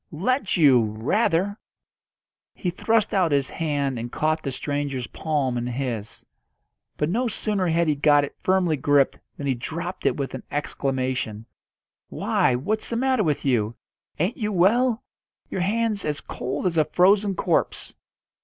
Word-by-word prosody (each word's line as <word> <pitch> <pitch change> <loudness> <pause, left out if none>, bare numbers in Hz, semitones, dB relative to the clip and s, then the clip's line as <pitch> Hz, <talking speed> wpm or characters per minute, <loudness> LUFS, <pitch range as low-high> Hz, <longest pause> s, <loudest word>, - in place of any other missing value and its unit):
"Let 210 - 0
you! 140 -7 +6
rather!" 165 - 0 1.0
He 180 - -2
thrust 220 +4 +1
out 185 -5 +2
his 140 -2 +1
hand 145 -6 -1
and 120 +1 -5
caught 155 +1 0
the 140 - -3
stranger's 140 -1 -3
palm 140 -6 -1
in 120 - -3
his. 120 -4 -4 0.7
But 150 - +1
no 235 +9 0
sooner 210 -4 -1
had 170 0 +2
he 155 - +3
got 145 0 +4
it 145 - -6
firmly 185 -4 +2
gripped 140 0 +2 0.2
than 145 - -5
he 135 - +2
dropped 165 +9 -4
it - - +1
with 140 -2 -3
an 130 - -5
exclamation: 130 -6 -2 0.6
"Why, 125 - +1
what's 215 - -2
the 235 - -2
matter 260 -2 +2
with 150 -5 -1
you? 115 -4 +1 0.4
Ain't 185 - 0
you 215 -4 -2
well? 225 +6 +3 0.5
Your 190 - -2
hand's 215 +1 0
as 150 -2 -1
cold 130 +4 -4
as 170 -2 +1
a 155 - +4
frozen 195 +4 +3
corpse." - - 0
155 Hz, 155 wpm, -24 LUFS, 135-195 Hz, 1.0 s, you